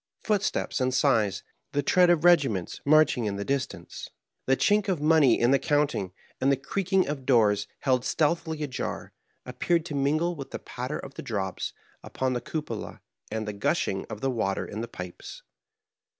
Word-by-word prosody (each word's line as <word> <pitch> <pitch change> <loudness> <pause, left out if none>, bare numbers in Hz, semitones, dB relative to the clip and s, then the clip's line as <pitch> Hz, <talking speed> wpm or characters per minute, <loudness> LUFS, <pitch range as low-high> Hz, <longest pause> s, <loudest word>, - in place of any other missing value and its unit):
Footsteps 205 -9 0
and 130 0 +2
sighs, 120 -7 +2 0.3
the 145 0 +1
tread 180 +5 +4
of 170 -2 +3
regi 175 -5 +6
ments 95 -5 -5
marching 150 -5 +4
in 100 -1 -1
the 100 0 -4
distance, 140 -1 -4 0.4
the 135 0 +3
chink 205 0 +2
of 180 -5 0
money 150 -5 +4
in 120 +2 +3
the 135 - +4
counting, 145 - 0 0.3
and 135 +2 +3
the 135 - +2
creaking 190 +6 0
of 140 -2 -4
doors 105 -5 +3
held 130 -3 +2
stealthily 160 +1 0
ajar, 135 -3 -4 0.3
appeared 170 -2 0
to 155 - -6
mingle 155 +5 +1
with 140 -3 -8
the - - -5
patter 125 +1 -5
of 135 - -9
the - - -7
drops 95 -5 -3 0.3
upon 130 -1 -2
the 120 - -2
cupola 145 -9 -5 0.3
and 110 0 -3
the 105 - -3
gushing 100 - -1
of - - -7
the 135 0 0
water 100 -5 -1
in 105 - -6
the 120 - -4
pipes. 90 -5 -9
135 Hz, 180 wpm, -27 LUFS, 115-155 Hz, 0.4 s, regi